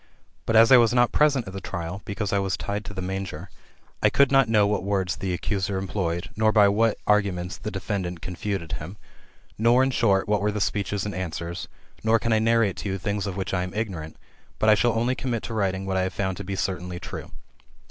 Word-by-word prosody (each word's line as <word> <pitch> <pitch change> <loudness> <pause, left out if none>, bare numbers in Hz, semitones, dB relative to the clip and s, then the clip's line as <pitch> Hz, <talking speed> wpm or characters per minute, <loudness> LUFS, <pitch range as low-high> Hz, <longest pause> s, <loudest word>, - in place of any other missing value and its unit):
But 115 - +1
as 115 +2 +7
I 130 - +10
was 120 0 +4
not 120 -1 +4
present 145 -5 +3
at 95 - -8
the 95 - -6
trial, 95 0 -5
because 100 0 -3
I 100 - +3
was 95 -1 -1
tied 100 +1 -3
to 100 - -7
the 95 - -4
manger, 95 -1 -5 0.5
I - - +5
could 140 -1 +3
not 135 -4 +4
know 105 -2 +4
what 105 0 0
words 95 -3 0
the 95 - -3
accuser 95 +2 -2
employed, 95 -1 -3
nor 110 0 +3
by 105 -2 +6
what 110 +2 +2
arguments 95 -4 +1
the - - -4
defendant 95 -3 -3
confuted 90 -1 -4
him, 85 +5 -6 0.6
nor 120 +3 +5
in 135 - +1
short, 100 -6 +2
what 105 -1 +1
were 105 +1 +1
the 105 - -3
speeches 100 0 -1
and 105 - -3
answers; 85 -2 -4 0.4
nor 110 +1 +4
can 115 0 0
I 110 - +3
narrate 115 -3 +2
to 100 - -4
you 95 - -2
things 100 +2 -2
of 95 -1 -4
which 95 - -3
I 90 - +1
am 90 +1 -5
ignorant; 90 -8 -4 0.4
but 110 - +2
I - - +8
shall 120 +2 +2
only 120 +3 +1
commit 125 -3 -3
to 115 - -5
writing 95 -3 -1
what 95 -1 -1
I - - +2
have 95 0 -2
found 95 -2 -1
to 100 - -6
be 95 +1 -4
certainly 90 -2 -3
true. - - -7
100 Hz, 230 wpm, -25 LUFS, 95-110 Hz, 0.6 s, I